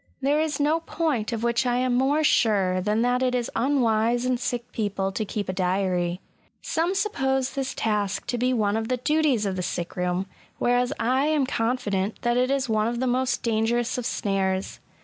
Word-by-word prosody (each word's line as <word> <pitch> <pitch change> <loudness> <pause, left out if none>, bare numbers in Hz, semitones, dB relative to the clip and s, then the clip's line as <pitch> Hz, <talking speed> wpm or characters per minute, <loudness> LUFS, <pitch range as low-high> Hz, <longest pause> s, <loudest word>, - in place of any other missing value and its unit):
There 285 +3 +2
is 310 -2 -1
no 300 +3 +2
point 310 -9 -2
of 230 -1 -3
which 235 +1 +2
I 245 -1 +1
am 250 0 +1
more 275 +5 +2
sure 195 -9 +2
than 210 +4 +1
that 245 +1 +1
it 255 -1 +1
is 245 -2 -2
unwise 240 -2 +2
in 255 -1 +1
sick 245 -1 -3
people 200 -3 -2
to 215 - -2
keep 205 -1 -4
a 185 - -2
diary. 180 -1 0 0.4
Some 340 +4 0
suppose 270 -10 0
this 270 -1 -3
task 205 -2 -1
to 245 0 -2
be 250 +1 +2
one 215 -4 +1
of 225 0 -2
the 255 +1 0
duties 285 -4 +1
of 190 -1 -2
the - - -1
sick 175 -1 -4
room; 180 +1 -1 0.3
whereas 245 +1 +1
I 260 +4 +2
am 305 -3 +2
confident 225 -5 -1
that 240 0 +2
it 250 +1 +2
is 275 -1 0
one 215 -1 +1
of 235 0 -2
the 260 - 0
most 255 +1 0
dangerous 230 +1 0
of 245 - -2
snares. 190 -1 -1
240 Hz, 200 wpm, -25 LUFS, 205-260 Hz, 0.4 s, There